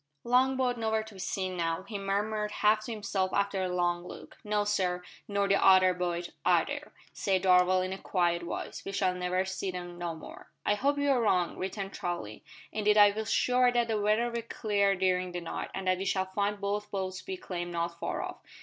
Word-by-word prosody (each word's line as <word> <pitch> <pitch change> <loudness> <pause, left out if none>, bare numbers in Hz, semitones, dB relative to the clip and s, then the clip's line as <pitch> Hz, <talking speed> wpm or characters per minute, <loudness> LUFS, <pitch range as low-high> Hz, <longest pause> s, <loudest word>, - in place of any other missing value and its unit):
"Long 255 +2 +3
boat 250 -2 0
nowhere 220 -1 0
to 220 0 -12
be 190 - -12
seen 185 0 -2
now," 165 0 -1
he 200 +1 -6
murmured 210 +2 -1
half 215 +1 +2
to - - -5
himself 200 -3 -1
after 200 -1 +1
a 185 - -1
long 175 -1 0
look. 180 - -10
"No, 210 0 +1
sir 185 -3 0 0.2
nor 200 -1 +1
the 195 0 +3
other 185 -1 +7
boat 175 -1 -3
either," - - +1 0.2
said 190 -2 0
Darvall 185 0 +4
in 185 - -3
a 190 - -7
quiet 175 -3 +1
voice. 170 - -5
"We 195 - -6
shall 190 -2 +1
never 180 +1 0
see 190 0 -3
'em 175 -1 -7
no 170 -1 -3
more." 160 - -11 0.2
"I - - +3
hope 280 +7 +1
you 285 0 +2
are 255 -3 +3
wrong," 180 -6 +2
returned 195 +1 -4
Charlie; 140 -12 -4 0.3
"indeed 210 0 +2
I 205 -1 +8
feel 215 +2 -4
sure 250 +2 +3
that 240 -1 +2
the 215 -2 0
weather 215 +3 +2
will 235 0 -2
clear 205 -3 +1
during 185 -1 0
the 175 - -3
night, 170 - -5
and 195 - -4
that 185 0 +2
we 195 - -3
shall 190 0 +1
find 200 +2 -1
both 205 +1 -2
boats 190 -2 -3
becalmed 185 - -5
not 170 0 -3
far - - -2
off." - - -6
195 Hz, 215 wpm, -30 LUFS, 180-210 Hz, 0.3 s, I